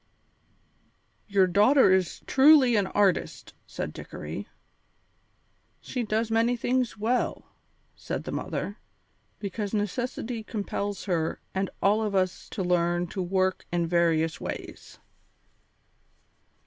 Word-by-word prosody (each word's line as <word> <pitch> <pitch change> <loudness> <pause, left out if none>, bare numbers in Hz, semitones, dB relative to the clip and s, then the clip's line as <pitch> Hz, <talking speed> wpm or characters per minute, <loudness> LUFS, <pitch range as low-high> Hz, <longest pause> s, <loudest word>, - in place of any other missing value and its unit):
"Your 195 -2 +4
daughter 205 +5 +5
is 185 -2 0
truly 270 -3 +6
an 200 -2 +2
artist," 200 -2 0
said - - -5
Dickory. - - -7 1.3
"She 250 - -4
does 220 0 -1
many 230 +2 +2
things 245 -1 0
well," 235 +4 -1 0.5
said - - -5
the - - -6
mother, 205 - -4 0.6
"because 205 +1 -4
necessity 230 +2 -2
compels 205 -2 -4
her 165 -5 -1
and 190 0 -1
all 210 +2 +4
of 210 -2 -1
us 185 -1 -1
to 195 - -3
learn 175 0 +1
to 190 - -4
work 185 +1 0
in 175 -1 +1
various 165 -2 +1
ways." - - -7
200 Hz, 110 wpm, -27 LUFS, 185-225 Hz, 1.3 s, truly